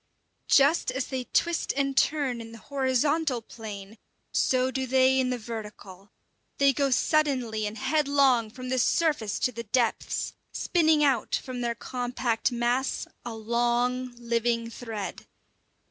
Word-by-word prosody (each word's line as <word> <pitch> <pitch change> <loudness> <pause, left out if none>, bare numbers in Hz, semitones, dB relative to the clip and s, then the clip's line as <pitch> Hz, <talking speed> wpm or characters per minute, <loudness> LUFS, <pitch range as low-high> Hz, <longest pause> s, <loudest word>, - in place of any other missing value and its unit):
Just 285 +4 +4
as 260 0 -3
they 260 -2 -3
twist 340 +7 0
and 275 -1 0
turn 270 -5 +1
in 225 0 -10
the - - -9
horizontal 275 +2 0
plane, 215 -2 -9 0.3
so 255 0 +2
do 260 0 -2
they 260 +1 +4
in 255 -1 +1
the 250 - -1
vertical. 210 -4 -9 0.5
They 280 -1 +4
go 280 +1 +1
suddenly 255 -6 +1
and 210 +2 -6
headlong 275 -4 +2
from 255 +3 -8
the 260 0 +1
surface 290 -7 +1
to 250 - 0
the 235 -1 -6
depths, 235 +1 0 0.2
spinning 315 -3 +2
out 265 -6 +2
from 255 -1 -5
their 235 -1 -1
compact 245 0 -2
mass 240 +2 0 0.2
a 235 -2 -6
long, 240 +2 0
living 235 -1 -1
thread. 225 -4 -6
250 Hz, 140 wpm, -27 LUFS, 230-270 Hz, 0.5 s, Just